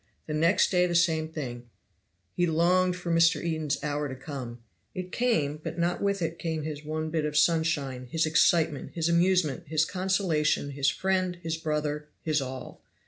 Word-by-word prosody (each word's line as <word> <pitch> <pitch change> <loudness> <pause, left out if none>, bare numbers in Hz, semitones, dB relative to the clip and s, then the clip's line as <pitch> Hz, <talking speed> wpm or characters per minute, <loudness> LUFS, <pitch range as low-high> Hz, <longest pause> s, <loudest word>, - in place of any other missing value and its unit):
The 155 - -4
next 165 +5 +3
day 180 -1 +3
the 175 - -2
same 160 -2 +2
thing. 120 -6 -6 0.6
He 175 - +1
longed 180 +3 +3
for 175 -1 -4
Mr. 165 -1 +4
Eden's 155 -3 -1
hour 145 -1 -2
to 130 - -5
come; 130 -3 -7 0.4
it 185 0 -5
came, 160 -13 +1
but - - -5
not 170 +1 0
with 200 -2 0
it 165 0 -3
came 160 -2 -2
his 150 -1 -5
one 155 +1 -3
bit 160 -1 0
of 150 0 -1
sunshine, 150 -5 +1
his 160 +4 +1
excitement, 155 -1 +2
his 165 -1 0
amusement, 170 -4 +2
his 155 +1 +2
consolation, 180 -6 0
his 140 0 +1
friend, 185 +1 0
his 165 0 -1
brother, 150 -2 -2 0.2
his 155 -2 +1
all. 130 -1 -7
160 Hz, 175 wpm, -28 LUFS, 150-175 Hz, 0.6 s, Mr